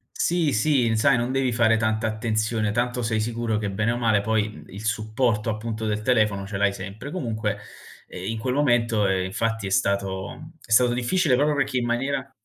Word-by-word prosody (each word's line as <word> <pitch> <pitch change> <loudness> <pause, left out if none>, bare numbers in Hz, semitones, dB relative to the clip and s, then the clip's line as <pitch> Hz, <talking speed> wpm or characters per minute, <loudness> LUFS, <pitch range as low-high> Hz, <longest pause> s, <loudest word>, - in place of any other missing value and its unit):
Sì, 170 -4 +1
sì, 120 -2 +2
sai 135 +4 +4
non 120 +2 -1
devi 135 -2 +1
fare 115 -1 +3
tanta 110 0 0
attenzione. 110 -1 -1
Tanto 120 +1 -1
sei 110 -1 0
sicuro 115 0 -1
che, 105 -2 -2
bene 105 +4 0
o 120 - -1
male 110 -4 +2
poi, 110 0 0
mhmm, - - -12
il 100 +3 -9
supporto, 110 +1 0
appunto, 110 0 -3
del 105 0 -1
telefono 105 -5 +1
ce 100 -1 -4
l'hai 100 0 +2
sempre. 100 +8 -7
Comunque, 115 -11 -2 0.5
ehm, 95 +4 -5
in 110 - -4
quel 125 +3 -1
momento, 120 -6 +2
ehm, 95 -1 +1
infatti 115 +2 -2
è - - -3
stato 100 - -2
è 115 - -15
stato 120 +1 +5
difficile 130 +3 +2
proprio 145 +2 +2
perché 135 -2 0
in 120 - 0
maniera 135 +3 -2
115 Hz, 200 wpm, -24 LUFS, 105-125 Hz, 0.5 s, stato